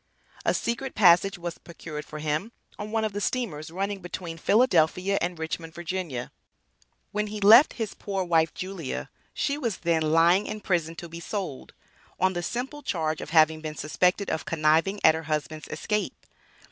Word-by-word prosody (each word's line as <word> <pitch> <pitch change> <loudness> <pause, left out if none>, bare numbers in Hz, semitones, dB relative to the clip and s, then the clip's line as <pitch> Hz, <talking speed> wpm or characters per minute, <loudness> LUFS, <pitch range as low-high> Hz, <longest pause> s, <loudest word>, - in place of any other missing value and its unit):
A - - +2
secret 235 +3 -2
passage 190 0 +5
was 175 -1 -6
procured 155 -3 -8
for 155 - -8
him 155 +9 -2 0.3
on 210 0 -5
one 220 0 0
of 215 - -3
the 205 - -3
steamers 190 -12 -2
running 195 +4 -3
between 175 -2 -6
Philadelphia 190 -3 +3
and 175 0 -2
Richmond, 160 0 -5
Va. 170 -7 -4 0.8
When 210 0 -1
he 210 0 -5
left 225 +8 +8
his 225 -4 -4
poor 195 -2 -3
wife, 165 -2 +2
Julia, 185 -7 -5 0.2
she 285 0 -1
was 235 -8 -2
then 165 -1 +1
"lying 165 +5 +4
in 215 - -4
prison 165 -4 0
to 170 - -7
be 170 +1 -8
sold," 170 -6 -5 0.5
on 185 0 +3
the 175 - -2
simple 255 +10 -4
charge 160 - -2
of - - -7
having 160 -1 +4
been 155 -1 -5
suspected 180 +7 +1
of 160 - -2
conniving 165 +5 +2
at 160 - +7
her 160 0 -4
husband's 155 0 -3
escape. 210 -1 -3
175 Hz, 170 wpm, -26 LUFS, 160-205 Hz, 0.8 s, left